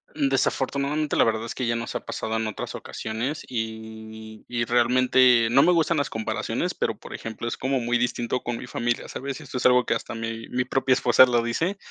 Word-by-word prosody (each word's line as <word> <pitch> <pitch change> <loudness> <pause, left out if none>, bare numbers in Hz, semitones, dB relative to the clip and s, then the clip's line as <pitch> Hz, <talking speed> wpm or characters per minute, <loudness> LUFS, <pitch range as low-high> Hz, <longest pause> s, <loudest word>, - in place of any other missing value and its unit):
Desafortunadamente, 140 +2 0
la - - +5
verdad 110 0 0
es - - -5
que 125 -2 -3
ya 115 - +1
nos 115 0 -4
ha - - -2
pasado 110 0 -4
en 110 0 -1
otras 110 - -5
ocasiones 115 +8 -4
y 110 -1 -7
y 120 -1 -1
realmente 125 0 +4
no 135 +2 +6
me 180 - +5
gustan 165 -1 +2
las 140 -2 0
comparaciones, 110 -1 -2
pero, - - -2
por - - -11
ejemplo, 110 +1 -6
es - - -3
como 130 0 0
muy 120 0 0
distinto 120 0 -1
con 120 -1 -3
mi - - -7
familia. 120 -1 -2
¿Sabes? 135 0 -5
Esto 130 - -7
es - - -4
algo 125 0 +4
que - - +1
hasta 120 - -4
mi 115 0 -5
mi 125 0 -1
propia 130 0 +2
esposa 125 +1 +6
lo 120 -1 +2
dice. 165 - -1
120 Hz, 210 wpm, -25 LUFS, 115-130 Hz, -, no